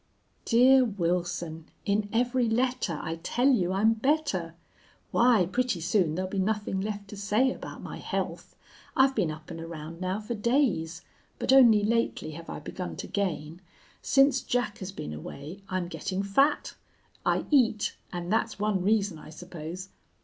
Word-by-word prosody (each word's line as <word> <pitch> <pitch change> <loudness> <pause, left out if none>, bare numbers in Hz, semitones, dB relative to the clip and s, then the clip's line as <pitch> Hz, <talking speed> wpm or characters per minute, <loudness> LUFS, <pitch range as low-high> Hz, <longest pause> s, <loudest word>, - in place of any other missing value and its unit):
"DEAR 255 +3 +6
WILSON, 175 -5 -2 0.2
In 205 0 +1
every 245 +1 +1
letter 240 - 0
I 165 +1 -3
tell 245 +9 +2
you 190 -9 +2
I'm 210 +4 +3
better! 225 - 0 0.6
Why, 235 -6 +4
pretty 240 +1 0
soon 170 -1 +1
there'll 185 +1 -3
be 195 - -1
nothing 205 -1 -1
left 205 0 -4
to 210 - -8
say 210 +6 +2
about - - -9
my - - -6
health. - - -4 0.4
I've 270 0 +5
been 205 -10 +1
up 155 +2 -8
and 165 -1 -6
around 165 0 -8
now 185 +2 -1
for 220 +2 -4
days, 210 - 0 0.3
but - - +2
only 235 -6 +7
lately 230 -6 0
have 165 +2 -9
I - - -5
begun 180 -1 -6
to - - -6
gain. 175 -4 -3 0.4
Since 270 -1 +4
Jack 245 -4 -1
has 190 0 -5
been 75 - -6
away 145 - -8
I'm 185 -2 -1
getting 195 +1 -3
fat. 275 +10 +2 0.5
I - - +1
eat, 230 -7 +3 0.2
and 175 +2 -3
that's 225 - 0
one 205 -2 0
reason 200 -3 +1
I - - -12
suppose. 175 +2 -8
200 Hz, 160 wpm, -28 LUFS, 175-235 Hz, 0.6 s, only